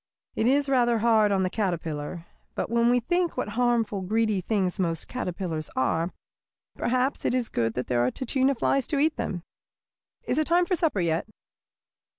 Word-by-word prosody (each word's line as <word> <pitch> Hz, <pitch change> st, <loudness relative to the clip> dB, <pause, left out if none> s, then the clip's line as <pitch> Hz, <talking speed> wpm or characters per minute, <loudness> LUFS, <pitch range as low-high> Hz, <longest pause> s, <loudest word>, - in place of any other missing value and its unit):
It 220 Hz, -, +1 dB
is 280 Hz, +2 st, +3 dB
rather 240 Hz, -3 st, +3 dB
hard 220 Hz, -2 st, +3 dB
on 190 Hz, -1 st, +2 dB
the 185 Hz, -, 0 dB
caterpillar. 170 Hz, -4 st, -3 dB, 0.3 s
But -, -, -3 dB
when 235 Hz, 0 st, +3 dB
we 245 Hz, 0 st, +4 dB
think 350 Hz, +5 st, 0 dB
what 250 Hz, -, -2 dB
harmful, 230 Hz, -3 st, +1 dB
greedy 215 Hz, +1 st, +1 dB
things 190 Hz, -1 st, -1 dB
most 165 Hz, -3 st, -1 dB
caterpillars 175 Hz, -9 st, -4 dB
are, 160 Hz, +7 st, 0 dB, 0.6 s
perhaps 255 Hz, +3 st, 0 dB
it -, -, +1 dB
is 250 Hz, -3 st, -1 dB
good 115 Hz, -1 st, -1 dB
that 125 Hz, -, -2 dB
there 120 Hz, -1 st, +1 dB
are 125 Hz, -, +2 dB
tachina 265 Hz, -, 0 dB
flies 275 Hz, +3 st, +1 dB
to 295 Hz, -, -1 dB
eat 310 Hz, +2 st, +2 dB
them. 175 Hz, -3 st, -4 dB, 0.8 s
Is 260 Hz, -, 0 dB
it 310 Hz, -, +1 dB
time 350 Hz, +1 st, +4 dB
for 365 Hz, -, +1 dB
supper 310 Hz, -, 0 dB
yet?" 165 Hz, +2 st, 0 dB
220 Hz, 175 wpm, -26 LUFS, 175-255 Hz, 0.8 s, we